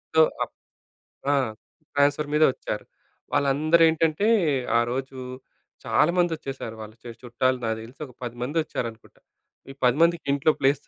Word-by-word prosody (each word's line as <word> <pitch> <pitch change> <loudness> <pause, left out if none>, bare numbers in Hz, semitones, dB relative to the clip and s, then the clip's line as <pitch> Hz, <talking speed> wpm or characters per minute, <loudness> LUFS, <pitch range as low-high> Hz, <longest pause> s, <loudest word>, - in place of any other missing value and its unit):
So, - - +6 0.2
ఆప్ - - -8 0.8
ఆ! - - +4 0.6
Transfer 145 +1 +2
మీదే 155 +1 +6
వచ్చారు. 105 - -5 0.5
వాళ్ళందరూ 155 +4 +3
ఏంటంటే 160 +5 +1 0.5
ఆ - - +5
రోజు, 135 +1 -4 0.7
చాలా 155 +3 +3
మంది 175 -1 +3
వచ్చేసారు. 135 -6 -6
వాళ్ళ 110 0 -9
చేస్ 120 -1 -8
చుట్టాలు 130 +2 +1
నాకు 110 0 -1
తెలిసి 125 +6 -14
ఒక 125 - -15
పదిమంది 120 +6 -5
వచ్చారనుకుంటా. 115 -6 -6 0.5
ఈ - - -9
10 125 +2 +4
మందికి 170 -1 +3
ఇంట్లో 140 +2 +3
ప్లేస్ 135 +1 +3
135 Hz, 145 wpm, -25 LUFS, 120-155 Hz, 0.8 s, So